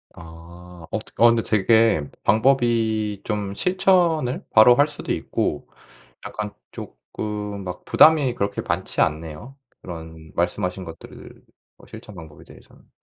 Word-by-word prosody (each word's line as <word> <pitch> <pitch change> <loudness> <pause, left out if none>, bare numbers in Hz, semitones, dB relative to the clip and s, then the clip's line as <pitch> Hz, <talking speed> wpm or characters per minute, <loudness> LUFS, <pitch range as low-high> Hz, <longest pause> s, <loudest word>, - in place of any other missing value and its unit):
아. 85 +1 -13
어 - - -1
되 - - -14
어 120 - +9
근데 115 -1 +2
되게 110 -7 +2
방법이 110 -3 +1
좀 105 -2 -3
실천을 175 - +1
바로 110 +3 +7
할 145 +4 +4
수도 150 - -7
있고 - - -3 0.6
약간 105 -1 -5 0.2
조금 105 - -7
막 90 -1 -7
부담이 150 -5 +5
그렇게 100 -2 -2
많지 - - -2
않네요. 80 - -3 0.2
그런 80 -2 -10
말씀 85 +1 -1
하신 90 +1 -5
것들 80 - -12 0.3
뭐 - - -19
실천 105 - -12
방법에 80 -4 -12
대해서는. - - -19
105 Hz, 260 characters per minute, -22 LUFS, 85-120 Hz, 0.6 s, 어